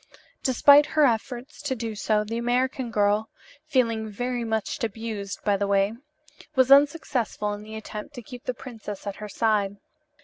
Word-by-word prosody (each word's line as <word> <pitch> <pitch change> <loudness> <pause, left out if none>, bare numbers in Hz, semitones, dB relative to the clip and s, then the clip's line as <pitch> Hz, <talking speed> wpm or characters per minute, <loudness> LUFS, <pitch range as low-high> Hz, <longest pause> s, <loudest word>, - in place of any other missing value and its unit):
Despite 285 +3 +6
her 305 0 +2
efforts 245 +4 -2
to 290 -3 -2
do 225 -2 -4
so, 210 0 +1
the 225 +2 -3
American 250 +1 0
girl 210 0 +1 0.4
(feeling 230 -6 +1
very 245 +3 -2
much 220 +2 -2
abused, 220 -3 -4
by 205 -1 +2
the 200 0 -1
way), 200 +1 +2 0.6
was 260 0 +4
unsuccessful 275 -7 +3
in 205 - -7
the 215 +1 -9
attempt 220 +5 -7
to 245 - -8
keep 245 +2 -11
the 250 - -2
princess 220 -6 -8
at 200 -1 -4
her 210 0 -7
side. 205 -3 +1
225 Hz, 165 wpm, -25 LUFS, 210-255 Hz, 0.6 s, Despite